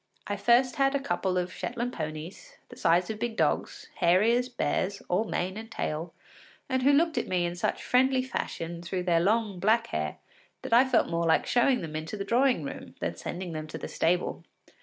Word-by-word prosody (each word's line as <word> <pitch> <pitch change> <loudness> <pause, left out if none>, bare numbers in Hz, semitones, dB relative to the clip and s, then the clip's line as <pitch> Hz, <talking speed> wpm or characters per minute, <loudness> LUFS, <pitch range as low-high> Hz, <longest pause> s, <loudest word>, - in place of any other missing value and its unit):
I 205 - -2
first 240 +5 +3
had 275 0 +3
a - - +2
couple 190 -9 -1
of 180 0 -2
Shetland 245 +1 -3
ponies, 160 - -7
the - - -11
size 175 +3 +2
of 215 - -6
big 235 0 -3
dogs, - - 0
hairy 185 +6 +4
as 250 +1 0
bears, 200 -5 -1
all 185 +5 +1
mane 185 -1 -2
and 225 +1 -8
tail, 165 -5 -3 0.6
and 260 -1 0
who 275 +3 +5
looked 315 +3 +3
at - - -4
me 180 -1 +1
in 175 0 -3
such 175 - -2
friendly 260 +1 +3
fashion 170 -9 -4
through 180 +1 -3
their 170 -2 +3
long 205 +1 +1
black 220 +5 +3
hair 75 0 -3 0.5
that - - -3
I 245 +3 +7
felt 255 -3 +2
more 170 0 0
like 160 - +3
showing 245 +1 +3
them 155 -3 -6
into 160 +7 -4
the 195 - -4
drawing 245 - +2
room 140 - -8
than - - -2
sending 180 -1 -5
them 155 -1 -5
to 155 - -7
the - - -6
stable. 175 +2 0
200 Hz, 205 wpm, -28 LUFS, 170-245 Hz, 0.6 s, I